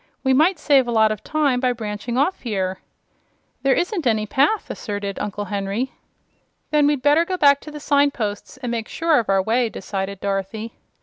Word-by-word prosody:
"We 265 -1 +3
might 330 +7 +4
save 275 -4 +3
a - - -1
lot 220 -1 +4
of 215 - -5
time 290 -5 +1
by 250 -1 +1
branching 220 +1 -4
off 290 +8 +1
here." 190 -5 -2 0.8
"There 270 -1 +3
isn't 350 - -1
any 215 -2 +1
path," 280 - +1
asserted 205 -2 -5
Uncle 205 0 -4
Henry. 200 +5 -2 0.8
"Then 300 -1 +4
we'd 290 -3 0
better 295 +3 +5
go 370 +2 -3
back 280 -3 +5
to 305 - -10
the 300 - -8
signposts, 280 -8 0
and 250 -2 -4
make 230 -2 -3
sure 325 -3 +2
of 225 - -4
our 195 -1 +3
way," 230 +3 +1
decided 195 -2 -5
Dorothy. 200 +3 -3
240 Hz, 185 wpm, -22 LUFS, 205-285 Hz, 0.8 s, better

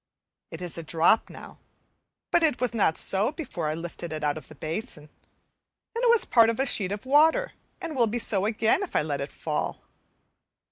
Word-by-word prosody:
It - - -8
is 170 -1 -3
a - - -6
drop 165 +7 +3
now, - - -12 0.7
but 345 - +4
it 315 -6 +2
was 250 -1 0
not 200 -8 +2
so 200 +6 0
before 235 - -5
I 155 - -2
lifted 170 0 -7
it 155 -1 -5
out 145 -1 +1
of 155 - -9
the 155 - -13
basin; 155 0 -5 0.8
then 465 +2 -3
it 485 - +4
was 470 -1 +5
part 230 -2 +5
of 230 - -2
a 270 - +2
sheet 200 -7 0
of 205 +4 -5
water, 315 - +4 0.3
and 330 -3 -5
will 240 -3 +3
be 225 +3 -2
so 205 -4 0
again 220 - +2
if 395 - -6
I - - +3
let 145 -2 -3
it 140 - -5
fall. 155 -2 -3
210 Hz, 205 wpm, -26 LUFS, 160-265 Hz, 0.8 s, was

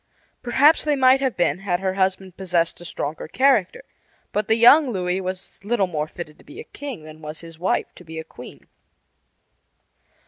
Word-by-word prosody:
Perhaps 280 +6 +4
they 300 -1 +1
might 260 0 +5
have 265 -3 -1
been 175 0 +1
had 185 -3 -1
her 190 0 -1
husband 190 -1 -1
possessed 175 -3 -1
a - - -10
stronger 150 -2 -5
character; 255 - +2 0.5
but 210 0 -1
the 220 - +3
young 265 +5 +7
Louis 185 -3 -1
was 185 +1 -6
little 210 -1 +1
more 155 -4 -3
fitted 155 -2 -9
to - - -18
be 315 +7 -12
a - - -6
king 275 - -8
than 155 0 -12
was 150 0 -7
his 165 -1 -12
wife 180 - -1
to - - -15
be 160 -1 -9
a 160 - -4
queen. - - -13
190 Hz, 185 wpm, -22 LUFS, 170-245 Hz, 0.5 s, young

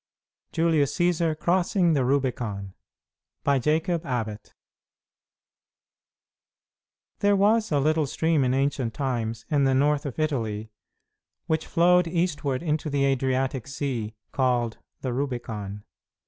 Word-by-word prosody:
JULIUS 160 -4 +2
CĆSAR 170 -3 +2
CROSSING 175 +1 +2
THE 140 -4 +2
RUBICON 120 -7 -1 0.7
By 140 -1 +3
Jacob 160 +5 0
Abbott 110 -7 -4 2.6
There 205 0 +4
was 215 +2 +3
a 145 - +3
little 155 +1 +2
stream 160 +1 +1
in 130 0 +1
ancient 135 -4 0
times, 115 -5 -2
in 145 -2 +3
the 135 0 +3
north 145 +2 +2
of 130 - -7
Italy, 110 -8 -2 0.7
which 160 0 -1
flowed 180 +1 +4
eastward 165 -5 -1
into 155 -1 -1
the 140 -1 +1
Adriatic 130 -2 0
Sea, 130 -6 -3 0.2
called 125 -3 0 0.2
the 130 -2 -2
Rubicon. 115 -7 -4
140 Hz, 115 wpm, -26 LUFS, 125-160 Hz, 2.6 s, There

